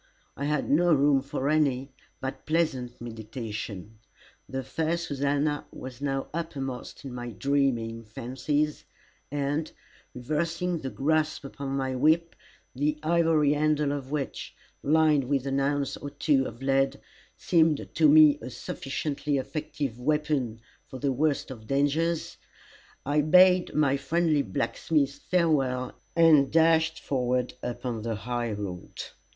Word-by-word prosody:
I 140 Hz, -, -3 dB
had 150 Hz, -1 st, 0 dB
no 175 Hz, +4 st, +3 dB
room 140 Hz, -2 st, +4 dB
for 135 Hz, 0 st, -3 dB
any 140 Hz, -3 st, +1 dB, 0.3 s
but 130 Hz, 0 st, -6 dB
pleasant 150 Hz, -7 st, 0 dB
meditations. 110 Hz, -3 st, -7 dB, 0.5 s
The 130 Hz, 0 st, -3 dB
fair 160 Hz, +5 st, -1 dB
Susannah 145 Hz, -1 st, -1 dB
was 130 Hz, 0 st, -9 dB
now 135 Hz, -1 st, -1 dB
uppermost 140 Hz, -6 st, -5 dB
in 130 Hz, -, -6 dB
my 120 Hz, -1 st, -5 dB
dreaming 120 Hz, -3 st, 0 dB
fancies, 135 Hz, +6 st, -2 dB, 0.4 s
and, 145 Hz, +2 st, -2 dB, 0.4 s
reversing 165 Hz, +7 st, -1 dB
the 135 Hz, -, -4 dB
grasp 155 Hz, +2 st, 0 dB
upon 135 Hz, 0 st, -4 dB
my 130 Hz, -1 st, -1 dB
whip, 160 Hz, +6 st, +2 dB, 0.4 s
the 150 Hz, +3 st, 0 dB
ivory 160 Hz, -3 st, +3 dB
handle 150 Hz, -1 st, +1 dB
of 140 Hz, -2 st, -4 dB
which, 145 Hz, -2 st, -4 dB, 0.3 s
lined 155 Hz, -2 st, +3 dB
with 135 Hz, 0 st, 0 dB
an 135 Hz, 0 st, 0 dB
ounce 140 Hz, 0 st, 0 dB
or 145 Hz, -, -6 dB
two 140 Hz, -1 st, +1 dB
of 115 Hz, +3 st, -10 dB
lead, 135 Hz, 0 st, +1 dB, 0.4 s
seemed 165 Hz, -6 st, +2 dB
to 155 Hz, -2 st, +5 dB
me 150 Hz, -1 st, +7 dB
a 120 Hz, -, -6 dB
sufficiently 140 Hz, +3 st, -3 dB
effective 145 Hz, -3 st, -4 dB
weapon 140 Hz, -5 st, 0 dB, 0.3 s
for 130 Hz, -, -8 dB
the 135 Hz, +2 st, 0 dB
worst 145 Hz, +1 st, 0 dB
of 110 Hz, -4 st, -10 dB
dangers, 155 Hz, +4 st, 0 dB, 0.7 s
I 145 Hz, +2 st, +2 dB
bade 180 Hz, +3 st, +5 dB
my 140 Hz, -2 st, +3 dB
friendly 155 Hz, +2 st, +1 dB
blacksmith 140 Hz, +7 st, -1 dB
farewell, 135 Hz, -8 st, +1 dB, 0.2 s
and 155 Hz, -5 st, +5 dB
dashed 165 Hz, 0 st, +3 dB
forward 125 Hz, -2 st, -1 dB
upon 120 Hz, -1 st, -4 dB
the 115 Hz, 0 st, -2 dB
high 120 Hz, +2 st, -3 dB
road. 100 Hz, -4 st, -6 dB
140 Hz, 130 wpm, -27 LUFS, 130-155 Hz, 0.7 s, me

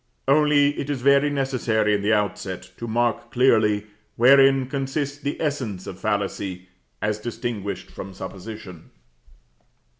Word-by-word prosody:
Only 145 Hz, 0 st, +4 dB
it 140 Hz, -, -4 dB
is 135 Hz, -4 st, -3 dB
very 140 Hz, +1 st, +5 dB
necessary 125 Hz, -6 st, 0 dB
in 100 Hz, -, +1 dB
the 105 Hz, +2 st, +1 dB
outset 105 Hz, -3 st, -2 dB
to 115 Hz, -, -6 dB
mark 120 Hz, 0 st, 0 dB
clearly 110 Hz, -5 st, +3 dB, 0.3 s
wherein 135 Hz, +2 st, +6 dB
consists 140 Hz, +1 st, -3 dB
the 145 Hz, -1 st, -4 dB
essence 130 Hz, -, -3 dB
of 90 Hz, -, -8 dB
fallacy 95 Hz, -2 st, -3 dB, 0.3 s
as 105 Hz, 0 st, 0 dB
distinguished 110 Hz, -3 st, -5 dB
from 95 Hz, -1 st, -8 dB
supposition. 95 Hz, -1 st, -9 dB
115 Hz, 125 wpm, -23 LUFS, 105-135 Hz, 0.3 s, wherein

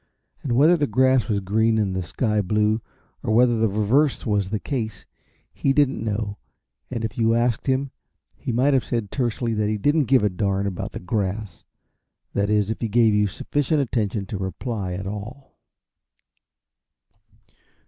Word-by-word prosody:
And 130 Hz, -, -2 dB
whether 150 Hz, +8 st, +5 dB
the 145 Hz, -4 st, 0 dB
grass 130 Hz, +2 st, +3 dB
was 100 Hz, -2 st, 0 dB
green 110 Hz, +4 st, +2 dB
and 100 Hz, -3 st, 0 dB
the 95 Hz, -, -1 dB
sky 105 Hz, +4 st, 0 dB
blue, 105 Hz, +3 st, +1 dB, 0.4 s
or -, -, -2 dB
whether 120 Hz, 0 st, +5 dB
the 110 Hz, -1 st, +3 dB
reverse 115 Hz, +8 st, +1 dB
was 100 Hz, -4 st, 0 dB
the 105 Hz, -, -1 dB
case, 110 Hz, -8 st, -4 dB, 0.5 s
he 135 Hz, -, +1 dB
didn't 140 Hz, -5 st, +2 dB
know; 105 Hz, -1 st, -2 dB, 0.5 s
and 115 Hz, -3 st, -3 dB
if 110 Hz, +1 st, -6 dB
you 115 Hz, 0 st, +3 dB
had 120 Hz, +1 st, +3 dB
asked 120 Hz, 0 st, -1 dB
him, 135 Hz, 0 st, 0 dB, 0.4 s
he -, -, -4 dB
might 130 Hz, +5 st, +2 dB
have 130 Hz, -, +3 dB
said 115 Hz, -5 st, -3 dB
tersely 120 Hz, -2 st, -1 dB
that 105 Hz, -1 st, 0 dB
he 110 Hz, -, 0 dB
didn't 145 Hz, +5 st, +2 dB
care 130 Hz, -5 st, +4 dB
a -, -, +3 dB
darn 100 Hz, +2 st, -1 dB
about 95 Hz, -3 st, -4 dB
the -, -, -5 dB
grass 100 Hz, +1 st, -3 dB, 0.7 s
that 100 Hz, 0 st, 0 dB
is, 105 Hz, 0 st, +2 dB
if 110 Hz, -, -5 dB
he 115 Hz, -, 0 dB
gave 115 Hz, 0 st, +4 dB
you 105 Hz, 0 st, +3 dB
sufficient 145 Hz, -, -1 dB
attention 110 Hz, -6 st, -1 dB
to 95 Hz, 0 st, -5 dB
reply 95 Hz, 0 st, -4 dB
at 95 Hz, +2 st, -5 dB
all. 105 Hz, +7 st, -7 dB
110 Hz, 175 wpm, -23 LUFS, 100-125 Hz, 0.7 s, whether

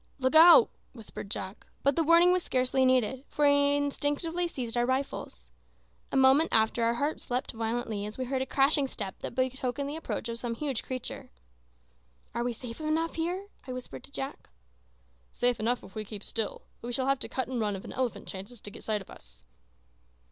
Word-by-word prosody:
"Look 260 Hz, 0 st, +1 dB
out!" 345 Hz, +9 st, +9 dB, 0.2 s
whispered 220 Hz, -4 st, -9 dB
Jack; 190 Hz, +1 st, -5 dB, 0.2 s
but 280 Hz, 0 st, +3 dB
the 330 Hz, -, +2 dB
warning 335 Hz, +3 st, +6 dB
was 365 Hz, 0 st, +2 dB
scarcely 260 Hz, -2 st, +1 dB
needed, 255 Hz, 0 st, +2 dB
for 295 Hz, -, +1 dB
we 285 Hz, 0 st, +5 dB
instinctively 290 Hz, +4 st, -1 dB
seized 245 Hz, -8 st, -5 dB
our 240 Hz, -, +2 dB
rifles. 255 Hz, -, -3 dB, 0.6 s
A -, -, +1 dB
moment 270 Hz, +5 st, +6 dB
after 220 Hz, +1 st, +3 dB
our 230 Hz, +1 st, +2 dB
hearts 290 Hz, +5 st, -2 dB
leaped 250 Hz, +1 st, -1 dB
violently 225 Hz, -2 st, -2 dB
as 210 Hz, -, -8 dB
we 260 Hz, -, -2 dB
heard 260 Hz, +1 st, -1 dB
a 265 Hz, -, -2 dB
crashing 275 Hz, +1 st, +3 dB
step 200 Hz, -7 st, -6 dB
that -, -, -6 dB
betokened 260 Hz, +1 st, -1 dB
the 290 Hz, -, -4 dB
approach 320 Hz, -6 st, -4 dB
of 230 Hz, 0 st, -4 dB
some 235 Hz, -1 st, -3 dB
huge 275 Hz, -2 st, -2 dB
creature. 255 Hz, -2 st, -5 dB, 1.0 s
"Are 235 Hz, +1 st, -1 dB
we 245 Hz, -, 0 dB
safe 235 Hz, +2 st, -8 dB
here?" 330 Hz, +4 st, -1 dB, 0.2 s
I -, -, -4 dB
whispered 255 Hz, 0 st, -8 dB
to -, -, -16 dB
Jack. 270 Hz, 0 st, -6 dB, 0.8 s
"Safe 245 Hz, 0 st, +1 dB
enough 240 Hz, +3 st, 0 dB
if 190 Hz, -, -13 dB
we 215 Hz, -, -4 dB
keep 210 Hz, -1 st, -8 dB
still. 225 Hz, -2 st, -3 dB, 0.2 s
But 235 Hz, -, -7 dB
we 245 Hz, -, -4 dB
shall 260 Hz, +2 st, 0 dB
have 275 Hz, 0 st, +2 dB
to -, -, -2 dB
cut 260 Hz, -, -2 dB
and 255 Hz, -1 st, -3 dB
run 210 Hz, -2 st, 0 dB
if 195 Hz, -, -7 dB
an -, -, -7 dB
elephant 255 Hz, -2 st, -2 dB
chances 200 Hz, +5 st, -7 dB
to 205 Hz, -, -5 dB
get -, -, -11 dB
sight 215 Hz, -2 st, -1 dB
of -, -, -27 dB
us." -, -, -15 dB
255 Hz, 200 wpm, -29 LUFS, 230-285 Hz, 1.0 s, out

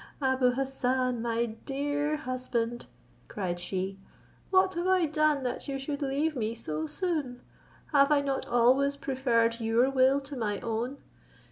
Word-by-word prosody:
Abou 260 Hz, -2 st, +2 dB
Hassan, 255 Hz, -2 st, 0 dB
my 235 Hz, 0 st, 0 dB
dear 285 Hz, +6 st, -2 dB
husband!" 250 Hz, -4 st, -3 dB, 0.4 s
cried 180 Hz, -4 st, -3 dB
she, 190 Hz, +2 st, -3 dB, 0.5 s
"what 375 Hz, 0 st, +4 dB
have 345 Hz, +1 st, -2 dB
I 370 Hz, -2 st, +4 dB
done 305 Hz, -2 st, +2 dB
that 250 Hz, +3 st, -3 dB
you 275 Hz, -1 st, -2 dB
should 285 Hz, +2 st, -4 dB
leave 290 Hz, +3 st, 0 dB
me 225 Hz, -2 st, -2 dB
so 155 Hz, -8 st, -4 dB
soon? 295 Hz, -, -2 dB, 0.5 s
Have 280 Hz, -1 st, +5 dB
I 290 Hz, -1 st, +5 dB
not 275 Hz, -1 st, -2 dB
always 255 Hz, +4 st, +3 dB
preferred 240 Hz, -4 st, +1 dB
your 230 Hz, +3 st, +2 dB
will 265 Hz, +1 st, +4 dB
to 275 Hz, +1 st, -8 dB
my 210 Hz, -5 st, -2 dB
own? 235 Hz, +4 st, -2 dB
260 Hz, 145 wpm, -29 LUFS, 230-285 Hz, 0.5 s, Have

